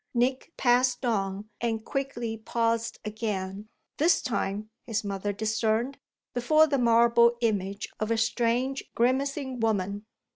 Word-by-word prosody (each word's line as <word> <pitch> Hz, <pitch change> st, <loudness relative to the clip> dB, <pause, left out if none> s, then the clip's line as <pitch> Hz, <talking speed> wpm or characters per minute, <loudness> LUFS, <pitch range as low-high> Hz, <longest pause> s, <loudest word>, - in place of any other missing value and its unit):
Nick 255 Hz, +5 st, 0 dB
passed 250 Hz, +1 st, +3 dB
on 200 Hz, -3 st, -1 dB
and 225 Hz, -1 st, -1 dB
quickly 240 Hz, -5 st, -3 dB
paused 230 Hz, +1 st, -1 dB
again; 210 Hz, -2 st, -4 dB, 0.3 s
this 330 Hz, +3 st, +4 dB
time, 210 Hz, -2 st, -2 dB, 0.2 s
his 220 Hz, -2 st, -1 dB
mother 200 Hz, 0 st, -2 dB
discerned, 220 Hz, +5 st, 0 dB, 0.3 s
before 310 Hz, +6 st, +4 dB
the 280 Hz, -3 st, 0 dB
marble 235 Hz, 0 st, +5 dB
image 200 Hz, -3 st, -1 dB
of 215 Hz, -, -1 dB
a 230 Hz, -, +2 dB
strange 240 Hz, +4 st, 0 dB
grimacing 265 Hz, +1 st, 0 dB
woman. 205 Hz, -2 st, -1 dB
230 Hz, 120 wpm, -27 LUFS, 215-250 Hz, 0.3 s, marble